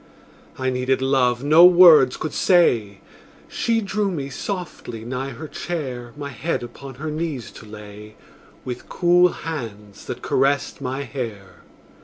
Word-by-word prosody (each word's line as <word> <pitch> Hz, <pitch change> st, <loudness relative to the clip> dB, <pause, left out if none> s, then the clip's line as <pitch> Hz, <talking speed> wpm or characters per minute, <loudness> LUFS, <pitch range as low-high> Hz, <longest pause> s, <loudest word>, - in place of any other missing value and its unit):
I 130 Hz, 0 st, -1 dB
needed 130 Hz, +1 st, 0 dB
love 130 Hz, -2 st, +1 dB
no 155 Hz, +4 st, +6 dB
words 170 Hz, -7 st, +7 dB
could 155 Hz, -, -5 dB
say; 115 Hz, -, +2 dB, 0.5 s
She 230 Hz, -1 st, 0 dB
drew 200 Hz, 0 st, -1 dB
me 140 Hz, -6 st, -4 dB
softly 130 Hz, -, -6 dB
nigh 130 Hz, +2 st, -4 dB
her 140 Hz, +5 st, -8 dB
chair, 130 Hz, -9 st, -5 dB
My 145 Hz, -1 st, -5 dB
head 140 Hz, +2 st, -3 dB
upon 135 Hz, +2 st, -10 dB
her 155 Hz, +4 st, -5 dB
knees 155 Hz, -5 st, -4 dB
to 110 Hz, -, -13 dB
lay, 105 Hz, 0 st, -11 dB, 0.5 s
With 125 Hz, -1 st, -7 dB
cool 175 Hz, 0 st, +4 dB
hands 110 Hz, -, -7 dB
that -, -, -7 dB
caressed 135 Hz, +1 st, 0 dB
my 135 Hz, +1 st, -3 dB
hair. 105 Hz, -10 st, -7 dB
135 Hz, 140 wpm, -22 LUFS, 120-160 Hz, 0.5 s, words